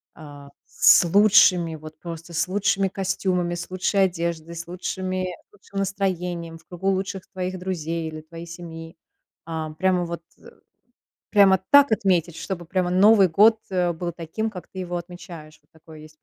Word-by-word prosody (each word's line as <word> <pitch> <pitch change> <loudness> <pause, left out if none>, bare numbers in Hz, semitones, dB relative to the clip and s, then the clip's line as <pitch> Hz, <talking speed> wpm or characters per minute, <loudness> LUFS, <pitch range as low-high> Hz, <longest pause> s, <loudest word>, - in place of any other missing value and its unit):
а 145 -2 -12 0.2
с - - +5
лучшими, 180 -3 +5
вот 155 0 -12
просто 170 0 -8
с 170 +2 0
лучшими 195 0 +1
костюмами, 185 -2 -1
с 170 0 -6
лучшей 185 +2 +1
одеждой, 170 -2 -4
с 170 0 -7
лучшими 185 +1 -3 0.2
с - - -50
лучшим 200 -1 -8
настроением, 180 -4 -2
в 160 - -23
кругу 180 +2 -6
лучших 190 -1 -3
твоих 185 0 -4
друзей 165 -3 -3
или 155 0 -7
твоей 165 +2 -11
семьи. 165 0 -9 0.5
Ам, 160 -1 -5
прямо 180 0 +1
вот, 170 0 -6 0.2
э, - - -14 0.8
прямо 195 -3 +6
так 285 -3 +7
отметить, 180 -6 +1
чтобы 175 -3 -5
прямо 180 +1 -1
Новый 195 +1 +6
год, 215 +6 +5
э, 180 -2 +1
был 175 +1 -4
таким, 175 +7 -4
как 180 -4 -10
ты 190 - -10
его 175 -1 -4
отмечаешь. 170 -3 -10
Вот 150 - -40
такое 160 -1 -15
есть. 155 0 -15
175 Hz, 165 wpm, -23 LUFS, 165-190 Hz, 0.8 s, так